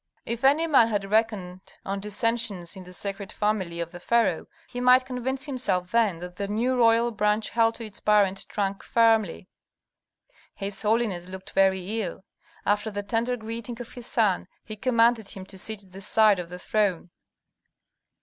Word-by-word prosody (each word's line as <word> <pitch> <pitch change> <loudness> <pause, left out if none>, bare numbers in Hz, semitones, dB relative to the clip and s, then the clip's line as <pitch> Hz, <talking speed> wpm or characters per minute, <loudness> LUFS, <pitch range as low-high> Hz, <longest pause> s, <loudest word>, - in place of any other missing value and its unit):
If 235 +1 -4
any 290 +5 +4
man 275 -8 +5
had 205 -3 -2
reckoned 210 -5 0 0.2
on 195 +1 -2
dissensions 210 -3 -2
in 190 -1 -10
the 180 - -12
sacred 195 +1 -4
family 195 -5 -1
of 170 0 -4
the 175 - -9
pharaoh, 225 -4 +1 0.2
he 245 - -6
might 250 +1 +6
convince 260 +1 -3
himself 200 -10 -1
then 225 -7 +2
that 180 0 -8
the 200 0 -3
new 235 +5 0
royal 235 0 +4
branch 210 0 0
held 230 -1 +2
to 230 - -7
its 210 -2 -7
parent 200 -2 +2
trunk 200 -2 -2
firmly. 225 -6 +2 1.1
His 195 0 -5
holiness 210 -5 0
looked 190 0 -9
very 195 +3 +1
ill. 190 -1 -6 0.4
After 205 +2 +1
the 205 -1 -4
tender 235 +4 -1
greeting 230 +1 -6
of 245 - -8
his 245 -2 -7
son, 210 -6 +1 0.2
he 215 - -6
commanded 230 -2 +2
him 190 -1 -6
to 190 0 -9
sit 215 +1 0
at 190 - -21
the 195 +1 -10
side 210 -1 +4
of 175 -1 -6
the 180 - -7
throne. 185 -3 -1
210 Hz, 175 wpm, -26 LUFS, 190-230 Hz, 1.1 s, might